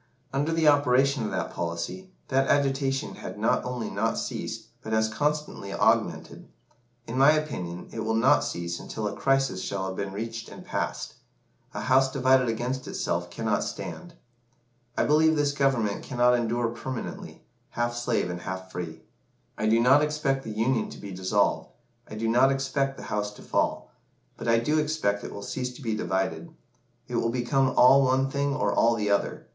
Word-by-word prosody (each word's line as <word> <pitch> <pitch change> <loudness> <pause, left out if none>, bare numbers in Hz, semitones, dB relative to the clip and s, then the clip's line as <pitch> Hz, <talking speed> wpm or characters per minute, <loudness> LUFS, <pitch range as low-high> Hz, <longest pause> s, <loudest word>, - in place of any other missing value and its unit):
Under 145 +4 0
the 165 -1 +2
operation 140 -2 +4
of 105 - -2
that - - -3
policy, 85 - -4 0.2
that 135 +1 +2
agitation 135 -1 +1
had - - -7
not - - +1
only 125 -2 -3
not 110 +3 -1
ceased, - - -4
but 110 - -5
has 110 0 +3
constantly 150 -7 -2
augmented. - - 0 0.6
In 125 +3 -3
my 140 +3 +7
opinion, 90 - -3
it 115 - -6
will 110 0 0
not 115 - +4
cease 85 0 -3
until 110 -1 -4
a 100 - -4
crisis 135 -8 +1
shall 95 -1 -3
have 95 0 -4
been 100 0 -3
reached 115 +3 -5
and - - -11
passed. - - -3 0.6
'A - - -3
house 130 +1 +3
divided 130 -2 +3
against 125 +3 -2
itself - - -2
cannot - - -1
stand.' 175 -2 -7 0.8
I - - +3
believe 160 +1 +4
this 145 -1 +2
Government 135 -7 +1
cannot 125 -1 +2
endure 120 0 +1
permanently, 120 +2 -6 0.3
half 120 0 -2
slave 120 -5 0
and 90 0 -6
half 95 +1 -6
free. 80 -3 -6 0.5
I 110 - -1
do 115 +1 +4
not 130 +5 +6
expect 150 -3 0
the - - -7
Union 115 +3 0
to - - -10
be 100 - -8
dissolved 95 +2 0 0.4
I - - -7
do 115 +1 -2
not 125 +4 +4
expect 135 0 -1
the - - -9
house 105 0 -2
to - - -14
fall - - -1 0.4
but - - -7
I 115 0 +5
do 150 +7 +1
expect 150 -10 0
it - - -6
will 100 - -7
cease 125 +2 -3
to - - -12
be 115 -2 -1
divided. 95 - -2 0.6
It 120 - -2
will 115 - +1
become 130 +2 +1
all 130 +2 +8
one 135 0 +2
thing 140 0 0
or - - 0
all 115 0 +4
the 105 -2 -1
other. 100 - 0
125 Hz, 180 wpm, -27 LUFS, 110-135 Hz, 0.8 s, all